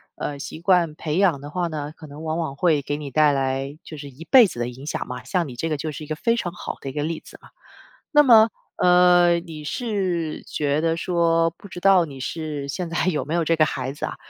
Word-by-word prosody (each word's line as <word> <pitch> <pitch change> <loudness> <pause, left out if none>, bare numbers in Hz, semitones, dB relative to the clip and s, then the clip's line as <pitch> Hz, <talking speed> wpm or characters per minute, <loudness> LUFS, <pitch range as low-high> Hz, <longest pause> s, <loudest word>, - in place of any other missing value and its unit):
呃， 145 -1 -5
习 155 - -7
惯 170 -4 +2
培 155 0 -3
养 175 -8 +3
的 145 +1 -9
话 175 0 -1
呢， 150 -2 -5
可 155 - -12
能 145 +2 -10
往 160 +1 -2
往 150 -5 -3
会 155 -1 +2
给 145 +1 -3
你 145 -2 -7
带 150 +2 +4
来 135 +1 -2
就 155 - -9
是 145 -1 -8
一 150 +6 -12
辈 250 -5 +7
子 120 - -8
的 120 - -1
影 130 +4 -9
响 - - -3
嘛， 125 0 -6
像 180 -4 -1
你 125 - -9
这 160 +7 -3
个 155 - -1
就 155 +2 -4
是 150 +1 -8
一 - - -10
个 155 - -3
非 230 +7 +1
常 185 -7 -3
好 180 - -7
的 135 - -5
一 - - -8
个 145 +1 -2
例 160 0 -3
子 - - -13
嘛。 - - -17 0.6
那 295 -2 +7
么， 225 -4 +7 0.3
呃， 180 -1 +5
你 160 -3 -9
是 185 -5 -2
觉 145 0 -1
得 165 0 +1
说 165 -1 +2
不 170 - -14
知 175 - -8
道 190 -1 +5
你 140 -4 -10
是 150 0 -4
现 170 +4 -4
在 170 - -1
有 150 -7 0
没 155 - -4
有 170 -2 +1
这 165 - +2
个 155 -1 +4
孩 130 -2 -3
子 145 - -4
啊， - - -5
160 Hz, 275 characters per minute, -23 LUFS, 145-175 Hz, 0.6 s, 辈